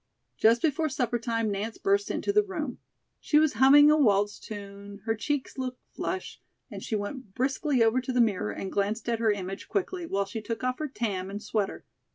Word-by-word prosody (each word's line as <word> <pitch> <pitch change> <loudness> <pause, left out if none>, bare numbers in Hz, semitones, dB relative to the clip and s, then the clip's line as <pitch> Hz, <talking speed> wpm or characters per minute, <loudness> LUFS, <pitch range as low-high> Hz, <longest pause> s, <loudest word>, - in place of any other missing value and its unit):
Just 230 +2 +4
before 315 0 +1
supper 245 -4 -1
time 230 -2 -1
Nance 210 +3 -3
burst 400 0 +1
into 405 - -1
the 420 - +6
room. 320 - -5 0.4
She 300 - +2
was 305 -1 +4
humming 290 +3 +8
a 305 - +5
waltz 205 -6 +2
tune; 200 -1 -9
her 225 - +1
cheeks 270 +4 -3
looked 255 -1 -4
flushed, 370 0 -4 0.3
and - - -7
she 220 - -3
went 205 0 -5
briskly 270 0 +1
over 225 +3 +3
to 255 - -4
the 250 - +1
mirror 205 - +2
and 190 - -5
glanced 210 +3 -1
at 230 -1 0
her 225 -2 +3
image 195 -1 -5
quickly, 370 -3 -2
while 200 -5 0
she 225 +3 -6
took 230 +2 -5
off 255 0 -1
her 305 - -2
tam 200 -8 -3
and 205 +2 -6
sweater. 210 -2 -2
235 Hz, 205 wpm, -28 LUFS, 205-290 Hz, 0.4 s, humming